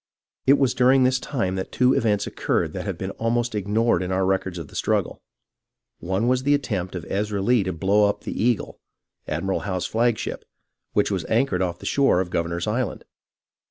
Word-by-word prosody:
It 140 +2 +7
was 135 -3 +2
during 130 +1 +4
this 130 0 +3
time 115 -11 -2
that 95 - -4
two 125 +1 +3
events 105 -3 +1
occurred - - -1
that - - -5
have - - -3
been - - -4
almost 120 +1 0
ignored 105 -1 +1
in 90 0 -3
our 95 0 +1
records 95 -1 -1
of 85 -4 -6
the - - -15
struggle. - - -1 0.8
One 95 +7 -1
was 125 0 +2
the 145 +2 +3
attempt 100 -10 -3
of 85 -2 -5
Ezra 105 +1 -1
Lee 120 +3 +3
to 95 - -1
blow 100 +5 +3
up 100 - -3
the - - -4
Eagle, 120 -2 0 0.5
Admiral 95 0 -1
Howe's 95 -3 -3
flagship, 115 0 -1 0.5
which 105 0 +2
was 95 -3 -1
anchored 110 -5 +1
off 85 -2 -1
the - - -12
shore 140 -9 +3
of 90 -1 -2
Governor's 85 +1 -1
Island. 110 0 -2
105 Hz, 195 wpm, -24 LUFS, 95-120 Hz, 0.8 s, It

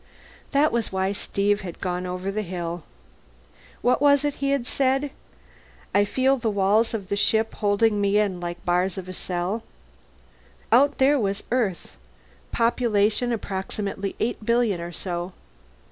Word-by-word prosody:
That 295 +2 +3
was 235 -2 -1
why 190 0 0
Steve 205 +1 0
had 180 -4 -8
gone 180 0 -2
over 180 +2 -3
the 215 +2 -2
hill. 175 -3 -4 1.0
What 250 +2 +3
was 285 0 +5
it 290 - 0
he 275 - +1
had 275 -3 +1
said? 270 +2 +1 0.8
I 205 +1 +4
feel 265 +6 +2
the 235 -3 -1
walls 210 +3 +2
of 200 -3 -6
the 200 - +1
ship 220 +2 +2
holding 205 0 +2
me 200 +1 +3
in 200 -4 +1
like 175 0 -4
the - - -27
bars 180 +2 +1
of 185 -1 -6
a 185 - -6
cell. 180 +5 -2 1.1
Out 280 +5 +5
there 275 +2 +4
was 200 -2 -1
Earth, 215 -9 -1 0.5
population 230 0 +2
approximately 200 -1 -3
eight 225 -1 -2
billion 230 -5 +2
or 170 0 -5
so. 175 0 -4
205 Hz, 155 wpm, -24 LUFS, 190-240 Hz, 1.1 s, was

